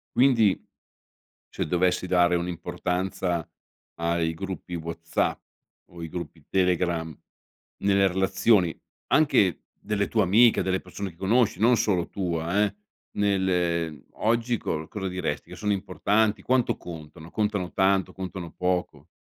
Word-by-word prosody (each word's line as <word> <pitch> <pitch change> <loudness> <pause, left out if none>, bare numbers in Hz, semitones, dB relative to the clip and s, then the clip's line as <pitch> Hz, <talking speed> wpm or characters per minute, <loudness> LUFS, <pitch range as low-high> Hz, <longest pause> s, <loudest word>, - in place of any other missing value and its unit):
Quindi, 120 -7 +4 0.9
cioè - - -3
dovessi 90 +2 +1
dare 90 -1 +3
un'importanza 90 0 -2 0.5
ai 85 -1 0
gruppi 95 -1 -6
WhatsApp 85 0 -2 0.5
o 85 -1 -11
i 80 - -4
gruppi 85 -3 -7
Telegram 85 -4 0 0.6
nelle 100 0 +3
relazioni, 95 0 +2 0.3
anche 105 - +3
delle 100 -1 -2
tue 110 -2 +2
amiche, 110 +6 +5
delle 95 0 0
persone 95 +2 -6
che 85 - -19
conosci, 100 +2 +2
non 120 +3 +5
solo 100 -6 +1
tua 90 +1 0
eh, 100 -1 -2 0.4
nel, 100 -2 +1
ehm, 85 -3 0
oggi 115 +1 +1
co 80 0 -3
cosa 95 +1 -4
diresti? 90 -6 -3
Che - - -8
sono 105 -1 0
importanti, 100 +2 +1
quanto 130 -1 +2
contano? 80 -1 -10
Contano 105 -4 -1
tanto? 95 -1 +2
Contano 90 -2 -6
poco? 90 -4 -2
90 Hz, 130 wpm, -26 LUFS, 85-100 Hz, 0.9 s, amiche